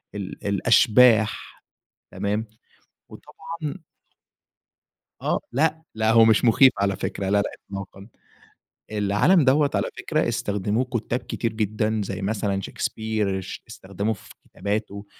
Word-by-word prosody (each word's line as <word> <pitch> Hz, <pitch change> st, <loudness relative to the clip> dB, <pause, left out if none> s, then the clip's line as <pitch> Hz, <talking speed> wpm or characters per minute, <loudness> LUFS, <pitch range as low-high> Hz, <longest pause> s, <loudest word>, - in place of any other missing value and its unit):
ال 100 Hz, 0 st, -6 dB
الأشباح 110 Hz, +1 st, +3 dB, 0.5 s
تمام؟ 105 Hz, +2 st, -2 dB, 0.6 s
وطبعًا 160 Hz, 0 st, -8 dB, 1.4 s
آه، -, -, 0 dB
لأ، 155 Hz, +5 st, +1 dB
لا، 110 Hz, 0 st, +2 dB
هو 115 Hz, 0 st, +7 dB
مش 110 Hz, +2 st, +4 dB
مخيف 130 Hz, +3 st, +6 dB
على 100 Hz, -1 st, +1 dB
فكرة 95 Hz, 0 st, -3 dB
لا، 100 Hz, +1 st, +3 dB
لا، -, -, -3 dB, 0.2 s
إطلاقًا. 100 Hz, 0 st, -8 dB, 0.8 s
العالم 105 Hz, -, +3 dB
دَوَّة 140 Hz, +2 st, +3 dB
على -, -, 0 dB
فكرة -, -, 0 dB
استخدموه 105 Hz, +4 st, -1 dB
كتاب 120 Hz, 0 st, -3 dB
كتير 115 Hz, -1 st, -3 dB
جدًا 110 Hz, 0 st, -1 dB
زي 95 Hz, -, -5 dB
مثلًا 100 Hz, -1 st, -1 dB
شيكسبير 105 Hz, 0 st, -2 dB
اش 95 Hz, -, -7 dB
استخدمه 100 Hz, +3 st, -3 dB
في 100 Hz, -, -11 dB
كتاباته، 100 Hz, 0 st, -4 dB
110 Hz, 120 wpm, -24 LUFS, 100-120 Hz, 1.4 s, هو